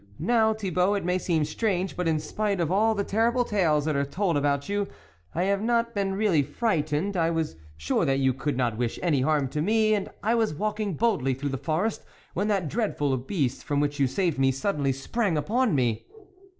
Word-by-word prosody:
" - - -26
Now, 220 -2 +4
Thi 200 -4 -4
bault, 180 +4 +2
it 195 - -4
may 180 +1 +1
seem 165 -4 +1
strange, 190 +2 -1
but 180 -1 -1
in 160 -1 +2
spite 200 +5 -2
of 170 -1 0
all 220 +3 +3
the 200 - 0
terrible 230 +5 +1
tales 160 -9 +1
that 155 -2 0
are 140 - +2
told 170 +5 -1
about 140 -1 0
you, 205 0 -1 0.5
I 175 - +1
have 200 +1 +1
not 235 +1 +1
been 195 -2 -1
really 195 -7 +3
frightened; 155 - -1
I 165 -2 +2
was 160 - -2 0.2
sure 75 - 0
that 135 -2 +2
you 135 -1 +2
could 135 +1 -2
not 120 -3 0
wish 120 -2 -1
any 155 -7 +2
harm 145 0 +2
to 150 +3 -2
me, 215 +4 +3
and 205 -2 -1
I 220 +3 +2
was 225 -8 +1
walking 210 0 -2
boldly 145 - +1
through 140 +2 -3
the 135 - -2
forest, 165 +10 -1 0.3
when 200 +4 -1
that 195 -6 0
dreadful 150 - 0
beast 135 -1 -2
from 145 -1 -1
which 145 0 -1
you 135 - +4
saved 170 0 -1
me, 135 0 +4
suddenly 140 0 0
sprang 170 - -1
upon 220 - +1
me." 120 -5 0
175 Hz, 215 wpm, -26 LUFS, 145-205 Hz, 0.5 s, Now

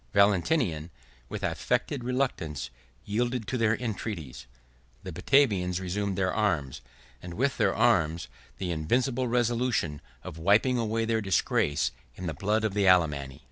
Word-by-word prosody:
Valentinian, 100 - +2 0.4
with - - -5
affected 135 -4 -1
reluctance, 120 - -2 0.3
yielded 120 +2 -1
to 115 - -2
their 115 -2 +2
entreaties; 95 - -5 0.6
the 95 - -6
Batavians 90 - +2
resumed 95 +1 -2
their 95 -1 +1
arms, 75 - 0 0.4
and 90 -1 -8
with 135 +5 0
their - - +2
arms, 85 -8 +2 0.3
the 90 -2 -3
invincible 120 - 0
resolution 120 - 0 0.2
of 80 - -8
wiping 110 +8 +3
away 115 0 0
their 115 0 0
disgrace 85 -6 +1 0.2
in 90 - -7
the 80 - -2
blood 105 +8 0
of 110 -3 0
the 100 -1 +2
Alemanni. 75 -6 +2
100 Hz, 140 wpm, -28 LUFS, 85-120 Hz, 0.6 s, wiping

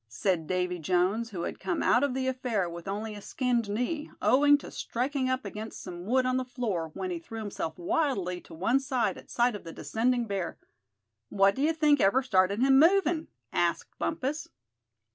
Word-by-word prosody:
said 165 - -1
Davy 180 -1 -1
Jones, 185 +7 +1
who 180 -5 -5
had - - -4
come 345 - -2
out 250 - +4
of 280 -3 0
the 265 0 -1
affair 250 -7 -1
with 170 +1 -8
only 210 +2 -3
a 205 - -8
skinned 240 -2 -1
knee, 250 +9 -2
owing 290 +2 +5
to - - -10
striking 260 +2 -2
up 255 -3 -1
against 215 +2 -6
some 175 -1 -7
wood 255 +2 +3
on 255 0 +1
the 260 - 0
floor, 220 -10 -3
when 370 - -3
he 345 - -3
threw 230 -9 -9
himself 205 -6 -4
wildly 180 - -1
to - - -13
one 230 +11 +2
side 250 -7 0
at - - -13
sight 240 0 +2
of 205 - -8
the 165 - -8
descending 240 +6 0
bear. 195 -5 -3 0.7
"What 195 0 +4
d'ye 290 +7 +1
think 300 -3 +3
ever 245 +8 +4
started 200 -2 +2
him 270 0 +6
movin'?" 335 -1 +4 0.3
asked - - 0
Bumpus. 300 0 -2
235 Hz, 190 wpm, -29 LUFS, 190-265 Hz, 0.7 s, him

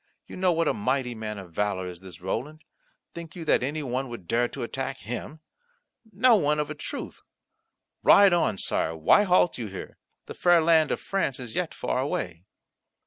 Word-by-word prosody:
You - - -10
know 185 -1 +2
what 165 -1 +1
a - - +2
mighty 125 +3 -1
man 110 -2 -5
of 95 -3 -10
valour 100 -1 -1
is 90 -1 -7
this 95 -3 -12
Roland. 130 - -4 0.5
Think 170 -2 -9
you 170 -2 -7
that - - +3
any 145 +4 -2
one 130 0 -3
would 120 -8 -9
dare 120 +4 +2
to - - -7
attack 135 +3 -4
him? 125 +7 -6 0.7
No 230 +4 +5
one, 150 -6 +2
of 150 0 -2
a - - -2
truth. 150 - -7 0.8
Ride 200 -2 +7
on, 165 - +1
Sire, 80 -3 -1
why 80 - +5
halt 180 -5 +3
you 115 - -4
here? 95 -1 -9 0.3
The - - -8
fair 175 -1 +4
land 160 -1 +4
of - - -1
France 190 -10 -2
is 120 -3 -7
yet - - -2
far - - -2
away." 90 0 -3
135 Hz, 195 wpm, -26 LUFS, 105-165 Hz, 0.8 s, Ride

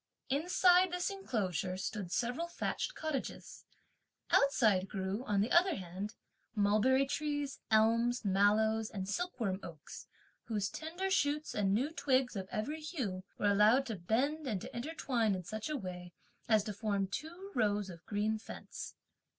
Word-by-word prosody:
Inside 360 +4 +4
this 360 +2 -1
enclosure, 195 - -2
stood 190 -1 -4
several 245 - -1
thatched - - -3
cottages. 310 -4 -4 0.7
Outside 215 -9 +4
grew, 195 +4 -2
on 200 -1 +2
the 215 - 0
other 365 +2 +5
hand, 190 +3 -6 0.4
mulberry 215 +6 +4
trees, 290 0 -2
elms, 230 +2 +3
mallows, 215 +3 +3
and 190 -2 -5
silkworm 225 - -2
oaks, 160 -5 -10 0.4
whose 210 -3 -1
tender 350 +5 -4
shoots 300 -4 +1
and 200 -2 +1
new 255 +10 +1
twigs, 260 -6 +1
of 190 -1 -4
every 295 +9 -3
hue, 245 - -3
were 205 - +3
allowed 215 +7 +5
to 225 -4 -3
bend 265 - 0
and 205 -7 -1
to - - -8
intertwine 240 -5 0
in 185 - -5
such 215 - -5
a 305 - -1
way 180 -5 -7 0.4
as 215 -2 +5
to 210 -1 -4
form 200 -1 0
two 335 - -6
rows 205 -4 +1
of 170 -1 -12
green 215 +1 0
fence. - - -8
220 Hz, 150 wpm, -34 LUFS, 200-290 Hz, 0.7 s, other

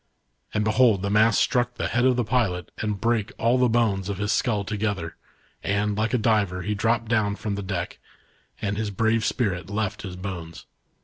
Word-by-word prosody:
And 105 - 0
behold 110 -2 +3
the 100 - -1
mast 110 +1 +4
struck 120 0 +1
the - - -2
head 120 +1 +1
of 130 -1 +4
the 125 - +1
pilot 105 -7 0
and 105 -2 -2
brake 115 0 0
all 120 +3 +2
the 125 -1 +4
bones 105 -5 +1
of 100 - -3
his 105 +1 -1
skull 105 -4 +1
together, 100 -5 -3 0.5
and, 100 +1 0
like 110 +3 0
a - - +4
diver 105 -5 +1
he 105 - -1
dropped 115 +3 0
down 110 -3 +1
from 105 0 -4
the 100 - -3
deck, 95 -3 -4 0.6
and 100 -1 -2
his 110 -1 -1
brave 110 +3 +1
spirit 95 -8 -1
left 105 0 -2
his 95 -3 -6
bones. 90 -3 -7
105 Hz, 195 wpm, -25 LUFS, 100-115 Hz, 0.6 s, mast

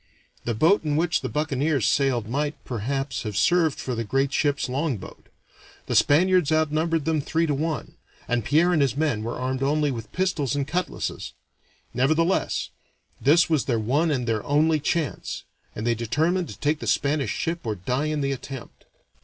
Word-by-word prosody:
The 120 - -1
boat 165 - +4
in 150 -2 0
which 165 +1 +1
the - - -3
buccaneers 145 -3 0
sailed 120 -1 +1
might, 145 +5 -1
perhaps, 130 +3 -2
have 105 -3 -4
served 165 +7 +3
for 130 - -3
the 115 -1 -2
great 135 +5 0
ship's 145 -1 +1
longboat; 130 - -4 0.6
the - - -3
Spaniards 175 +1 +4
outnumbered 155 0 +1
them 160 -2 +1
three 165 +4 0
to 150 - 0
one, 150 -2 -3 0.3
and 120 -2 0
Pierre 165 - +3
and 155 - +3
his 135 -1 +1
men 145 -8 0
were 115 +2 -4
armed 130 +1 -2
only 145 +1 +1
with 115 -3 -6
pistols 170 -9 0
and 140 -1 -1
cutlasses; 180 +4 -3 0.6
nevertheless 155 +8 +1 0.5
this 160 +5 +5
was 155 -4 +1
their 120 -4 +1
one 140 +10 +1
and 130 -5 -1
their 110 -2 0
only 155 +2 +2
chance, 150 0 -2 0.3
and 110 - -4
they 120 - +3
determined 160 +11 0
to - - -9
take 150 +1 0
the 115 - -6
Spanish 140 +6 +1
ship 170 +1 -2
or 110 -2 -2
to 90 - -17
die 130 +4 0
in 155 -1 -1
the 140 0 0
attempt. 135 -2 -8
145 Hz, 180 wpm, -25 LUFS, 125-160 Hz, 0.6 s, this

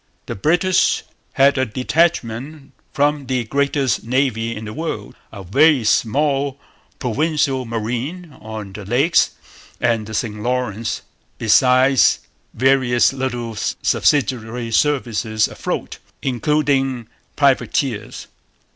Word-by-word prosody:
The - - -5
British 175 - +2 0.3
had 135 0 +4
a 130 - +2
detachment 135 +1 -1 0.2
from 145 -1 0
the 130 -2 0
greatest 140 +2 0
navy 115 -2 0
in 110 - -7
the 105 - -6
world, 150 -10 -5 0.2
a 100 -2 -9
very 140 - +4
small 140 +5 +1 0.4
'Provincial 135 0 0
Marine' 125 +9 -4
on 105 -2 -7
the 105 - -8
Lakes 130 - +3 0.5
and 115 -3 0
the 110 - -6
St 105 -2 -3
Lawrence, 120 -3 -2 0.3
besides 130 +3 +4 0.4
various 130 0 +3
little 120 -3 -3
subsidiary 120 0 0
services 115 -5 +1
afloat, - - -5 0.2
including 135 -2 0 0.3
privateers. 130 -5 0
130 Hz, 100 wpm, -19 LUFS, 115-140 Hz, 0.5 s, had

